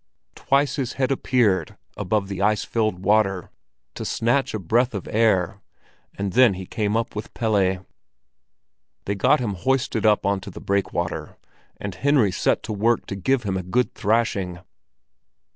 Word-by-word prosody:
Twice 140 Hz, +2 st, +1 dB
his 130 Hz, -4 st, -2 dB
head 135 Hz, 0 st, 0 dB
appeared 110 Hz, -, +1 dB, 0.2 s
above 100 Hz, +1 st, -1 dB
the 100 Hz, -1 st, -5 dB
ice 105 Hz, +1 st, +2 dB
filled 110 Hz, -5 st, -1 dB
water, 100 Hz, -3 st, +2 dB, 0.4 s
to -, -, -6 dB
snatch 120 Hz, +2 st, 0 dB
a -, -, 0 dB
breath 115 Hz, +6 st, +1 dB
of 100 Hz, -, -5 dB
air, 100 Hz, -3 st, +1 dB, 0.6 s
and 100 Hz, -2 st, -2 dB
then 125 Hz, -6 st, +5 dB
he 95 Hz, 0 st, -7 dB
came 105 Hz, +1 st, -1 dB
up 115 Hz, -2 st, -3 dB
with 105 Hz, -, -6 dB
Pelle. 95 Hz, -5 st, +1 dB, 1.2 s
They 100 Hz, -, -1 dB
got 125 Hz, +9 st, +3 dB
him 115 Hz, -5 st, -2 dB
hoisted 130 Hz, +3 st, 0 dB
up 105 Hz, -2 st, +3 dB
on 100 Hz, 0 st, +1 dB
to -, -, -8 dB
the -, -, -9 dB
breakwater, 90 Hz, -4 st, -2 dB, 0.4 s
and 100 Hz, -2 st, -5 dB
Henry 130 Hz, -1 st, +2 dB
set -, -, 0 dB
to -, -, -4 dB
work 115 Hz, +3 st, +1 dB
to 95 Hz, -, -5 dB
give 125 Hz, +6 st, 0 dB
him 100 Hz, -3 st, -2 dB
a 95 Hz, -, -1 dB
good 120 Hz, +8 st, 0 dB
thrashing. 100 Hz, -5 st, 0 dB
105 Hz, 160 wpm, -23 LUFS, 95-120 Hz, 1.2 s, then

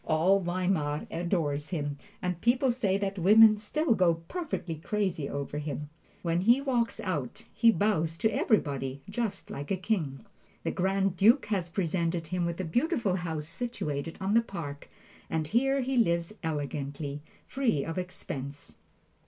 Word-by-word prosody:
All 170 Hz, +5 st, +3 dB
Weimar 175 Hz, -5 st, 0 dB
adores 160 Hz, -4 st, -1 dB
him, 145 Hz, -5 st, -3 dB, 0.2 s
and 180 Hz, -1 st, -2 dB
people 250 Hz, +2 st, +3 dB
say 210 Hz, -6 st, +1 dB
that 200 Hz, -1 st, -2 dB
women 215 Hz, +4 st, +8 dB
still 240 Hz, +7 st, 0 dB
go 180 Hz, -5 st, +3 dB
perfectly 180 Hz, -, -4 dB
crazy 180 Hz, -4 st, -1 dB
over 140 Hz, +1 st, -3 dB
him. 150 Hz, 0 st, -5 dB, 0.3 s
When 170 Hz, 0 st, +1 dB
he 235 Hz, +7 st, +5 dB
walks 250 Hz, -4 st, 0 dB
out, 150 Hz, -10 st, -3 dB
he 230 Hz, -, +5 dB
bows 170 Hz, -7 st, +1 dB
to 220 Hz, +5 st, +1 dB
everybody 140 Hz, -, 0 dB
just 200 Hz, -1 st, -3 dB
like 145 Hz, +1 st, -6 dB
a 195 Hz, -, +1 dB
king! 180 Hz, -6 st, -2 dB, 0.4 s
The -, -, 0 dB
Grand 195 Hz, 0 st, +1 dB
Duke 230 Hz, +9 st, +5 dB
has 185 Hz, -5 st, 0 dB
presented 170 Hz, -1 st, -1 dB
him 180 Hz, -1 st, 0 dB
with 170 Hz, +1 st, -4 dB
a -, -, -1 dB
beautiful 235 Hz, -, +1 dB
house 160 Hz, -4 st, -4 dB
situated 165 Hz, -7 st, -4 dB
on 195 Hz, +1 st, 0 dB
the 230 Hz, -, +6 dB
Park, 165 Hz, -10 st, -7 dB, 0.4 s
and 160 Hz, -1 st, 0 dB
here 270 Hz, -, +2 dB
he 260 Hz, +1 st, -1 dB
lives 170 Hz, -4 st, +2 dB
elegantly, 145 Hz, -1 st, -3 dB, 0.2 s
free 240 Hz, -, 0 dB
of 165 Hz, +2 st, -3 dB
expense. 145 Hz, -6 st, -6 dB
180 Hz, 155 wpm, -29 LUFS, 155-215 Hz, 0.4 s, women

